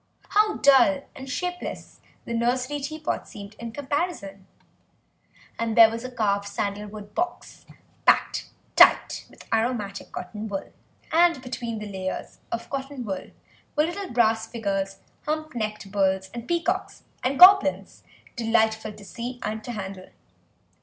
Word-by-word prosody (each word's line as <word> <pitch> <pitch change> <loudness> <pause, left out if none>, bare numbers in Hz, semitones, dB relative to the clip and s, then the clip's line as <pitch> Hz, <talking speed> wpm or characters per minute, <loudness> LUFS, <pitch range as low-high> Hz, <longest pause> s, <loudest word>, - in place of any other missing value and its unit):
How 425 0 +3
dull 275 +1 +5
and 265 0 -8
shapeless 355 +7 -5 0.2
the 235 - -4
nursery 250 +5 0
teapot 305 +2 -3
seemed 200 0 -10
in 235 -1 -6
comparison! 275 - -3 1.1
And 230 -1 -1
there 225 -1 +9
was 230 +1 -5
a 255 - -5
carved 200 -4 0
sandal 200 +1 -3
wood 205 0 -10
box 350 +1 -4 0.4
packed - - +3 0.3
tight - - +5
with - - -16
aromatic 220 -3 -1
cotton 210 +4 -6
wool, 195 -2 -5 0.4
and 340 -2 +4
between 240 -3 -4
the 210 - -5
layers 190 -2 -5
of 235 - -3
cotton 270 -2 -4
wool 190 -3 -4 0.5
were 300 - +4
little 370 +4 -3
brass 225 -2 +2
figures, 195 -4 -2 0.3
hump 310 0 -2
necked 215 -4 -4
bulls, 190 -1 +1
and 235 0 -7
peacocks 350 +2 -1 0.2
and 265 +2 0
goblins, 370 -5 +7 0.3
delightful 220 -2 +1
to 205 - -13
see 245 +4 -6
and 215 +1 -3
to 245 - -5
handle. 190 -3 -7
230 Hz, 140 wpm, -25 LUFS, 205-280 Hz, 1.1 s, there